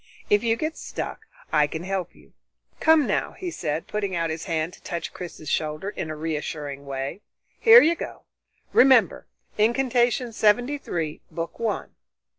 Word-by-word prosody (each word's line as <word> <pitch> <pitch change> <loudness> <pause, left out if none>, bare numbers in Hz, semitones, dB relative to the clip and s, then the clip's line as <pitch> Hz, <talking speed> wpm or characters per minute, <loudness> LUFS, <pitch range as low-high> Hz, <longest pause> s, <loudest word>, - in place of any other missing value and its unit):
If 205 +1 +4
you 225 -1 +2
get 310 +6 -3
stuck - - -6 0.3
I 150 -1 +4
can 160 +3 -5
help 190 -1 -3
you. - - -21 0.5
Come 320 -2 +5
now," - - -1
he 360 -2 -5
said, 155 - -3
putting 200 -3 -2
out 165 -1 0
his 160 +2 -5
hand 165 -1 -1
to - - -15
touch 170 -2 -5
Chris's 165 -3 -8
shoulder 155 +6 -1
in 170 -6 -5
a 155 - -4
reassuring 150 -2 -4
way, 135 +7 -4 0.4
"here 465 0 +9
you 330 - +4
go. 340 - -7 0.5
Remember 250 -7 +5 0.3
Incantation 240 +1 +2
Seventy 245 +7 +2
three, 160 - -4
Book 165 -1 -5
One." 225 -3 -2
190 Hz, 160 wpm, -25 LUFS, 155-240 Hz, 0.5 s, here